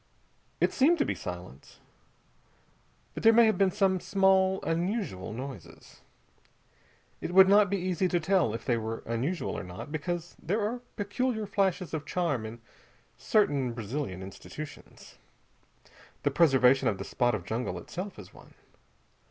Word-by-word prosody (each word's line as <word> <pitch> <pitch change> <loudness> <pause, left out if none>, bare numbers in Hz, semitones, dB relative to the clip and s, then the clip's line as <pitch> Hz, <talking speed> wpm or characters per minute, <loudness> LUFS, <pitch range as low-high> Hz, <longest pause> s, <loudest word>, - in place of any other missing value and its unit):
It - - +2
seemed 310 +6 +4
to 290 - +1
be - - -1
silence. - - -9 1.4
But - - -6
there 225 - +7
may 230 +1 +6
have 220 -4 +2
been 195 -1 +4
some 190 -1 +1
small 190 0 +3
unusual 170 - -2
noises. 130 +4 -9 1.2
It 175 - -4
would 190 0 +9
not 200 0 +5
be 200 - 0
easy 185 0 0
to 175 -1 +1
tell 165 - +1
if - - -7
they 120 - +1
were 110 0 -4
unusual 130 +10 -2
or - - -4
not, 90 +10 -8
because 170 +2 -4
there 200 +7 -1
are 240 +2 -4
peculiar 220 +2 -1
flashes 195 -3 0
of 155 -2 -4
charm 145 -11 -1
in 115 +1 -10 0.5
certain 140 - +1
Brazilian 115 -4 -4
institutions. 145 +10 -10 1.0
The - - +2
preservation 135 -5 +4
of 100 - +1
the - - -5
spot 120 -3 0
of 95 -5 -6
jungle 115 +5 -3
itself 190 +3 -7
is 95 -4 -12
one. - - -17
175 Hz, 150 wpm, -29 LUFS, 125-195 Hz, 1.4 s, would